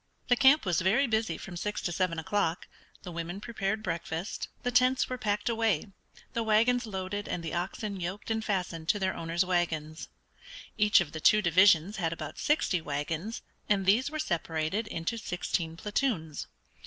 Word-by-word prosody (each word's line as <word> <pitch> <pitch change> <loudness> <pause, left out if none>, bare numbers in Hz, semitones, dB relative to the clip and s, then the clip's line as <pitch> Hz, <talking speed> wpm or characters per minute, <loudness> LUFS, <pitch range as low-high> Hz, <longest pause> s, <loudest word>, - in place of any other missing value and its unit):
The 245 - +6
camp 270 +2 +5
was 175 -2 +1
very 210 +10 +3
busy 220 -2 0
from 190 -4 -8
six 210 +4 -3
to 175 - -1
seven 170 -1 0
o'clock; 165 0 -1 0.4
the 180 - -7
women 170 +3 -5
prepared 215 -1 -2
breakfast; 165 0 -3 0.2
the 245 - 0
tents 255 +1 +3
were 255 - -4
packed 205 0 -1
away, 225 -6 +1 0.4
the 230 - 0
wagons 230 +2 +3
loaded 195 0 -4
and 170 - -3
the 160 - -4
oxen 195 +3 -3
yoked 190 +5 -4
and 220 0 0
fastened 180 -6 -2
to - - +4
their 190 -2 -1
owners' 165 +2 0
wagons. 165 -3 -1 0.7
Each 210 -3 +5
of 155 -4 -4
the 160 - -6
two 215 +4 +5
divisions 185 +2 +5
had 165 -4 0
about 155 -3 -7
sixty 245 - +1
wagons, 160 - -3 0.3
and 200 -2 +2
these 225 +8 +4
were 310 - -5
separated 170 - -1
into 210 +5 -3
sixteen 175 -4 -2
platoons. 205 - -2
190 Hz, 170 wpm, -29 LUFS, 165-220 Hz, 0.7 s, The